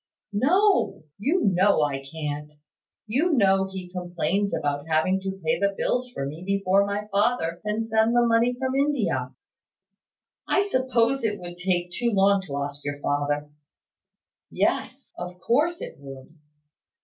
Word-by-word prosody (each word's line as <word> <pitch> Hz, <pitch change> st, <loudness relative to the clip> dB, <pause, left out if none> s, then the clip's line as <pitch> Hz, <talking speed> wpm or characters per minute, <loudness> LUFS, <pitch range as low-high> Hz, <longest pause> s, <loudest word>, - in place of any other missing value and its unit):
"No; 360 Hz, -, +2 dB, 0.2 s
you 315 Hz, -, +1 dB
know 190 Hz, -3 st, +4 dB
I 135 Hz, -2 st, -2 dB
can't. 150 Hz, 0 st, -5 dB, 0.5 s
You 280 Hz, +11 st, +1 dB
know 195 Hz, -5 st, +3 dB
he 185 Hz, -2 st, -7 dB
complains 180 Hz, +2 st, -1 dB
about 145 Hz, +1 st, -2 dB
having 165 Hz, +4 st, +2 dB
to 190 Hz, 0 st, -5 dB
pay 160 Hz, -, +1 dB
the 200 Hz, 0 st, +1 dB
bills 250 Hz, 0 st, 0 dB
for 135 Hz, -, -4 dB
me 150 Hz, +4 st, -6 dB
before 195 Hz, 0 st, +2 dB
my 205 Hz, +1 st, -2 dB
father 195 Hz, -5 st, +1 dB
can 210 Hz, +1 st, -1 dB
send 225 Hz, +1 st, +2 dB
the 240 Hz, 0 st, +5 dB
money 235 Hz, +1 st, +3 dB
from 260 Hz, 0 st, -2 dB
India." 285 Hz, +2 st, 0 dB, 1.2 s
"I 390 Hz, -, +3 dB
suppose 260 Hz, -, +1 dB
it 210 Hz, -2 st, -1 dB
would 175 Hz, 0 st, -8 dB
take 180 Hz, -1 st, -1 dB
too 240 Hz, +6 st, 0 dB
long 200 Hz, 0 st, +4 dB
to 140 Hz, -1 st, -2 dB
ask 145 Hz, 0 st, -6 dB
your 145 Hz, 0 st, -4 dB
father. 145 Hz, +1 st, -1 dB, 1.0 s
Yes; -, -, -1 dB
of 180 Hz, 0 st, -7 dB
course 300 Hz, -, +1 dB
it -, -, -7 dB
would. 135 Hz, +1 st, -11 dB
195 Hz, 150 wpm, -25 LUFS, 160-235 Hz, 1.2 s, the